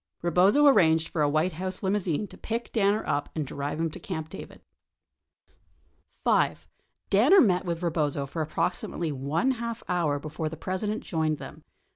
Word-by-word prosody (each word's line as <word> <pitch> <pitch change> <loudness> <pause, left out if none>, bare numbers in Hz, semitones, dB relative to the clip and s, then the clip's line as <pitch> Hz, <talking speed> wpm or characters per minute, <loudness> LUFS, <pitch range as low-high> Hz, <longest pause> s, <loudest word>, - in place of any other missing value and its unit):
Eebozo 190 - +4
arranged 160 - +4
for 160 - -2
a 145 - +3
White 155 +5 +1
House 185 +4 -4
limousine 190 -2 0
to - - -13
pick 230 +1 -4
Danner 210 -1 +2
up 145 -1 -1
and 155 -2 -1
drive 140 +3 -4
him 165 -1 0
to - - -9
Camp 160 -5 -5
David. - - -10 1.6
5. - - +1 0.4
Danner 255 - +6
met 185 -4 +2
with 170 -1 -3
Eebozo 150 -5 -1
for 160 +4 -4
approximately 160 +1 -2
one 145 - 0
half 235 -2 -4
hour 170 -5 +1
before 155 +2 -4
the 160 - -8
President 205 +6 -3
joined 160 -3 -1
them. - - -10
170 Hz, 160 wpm, -27 LUFS, 155-200 Hz, 1.6 s, Danner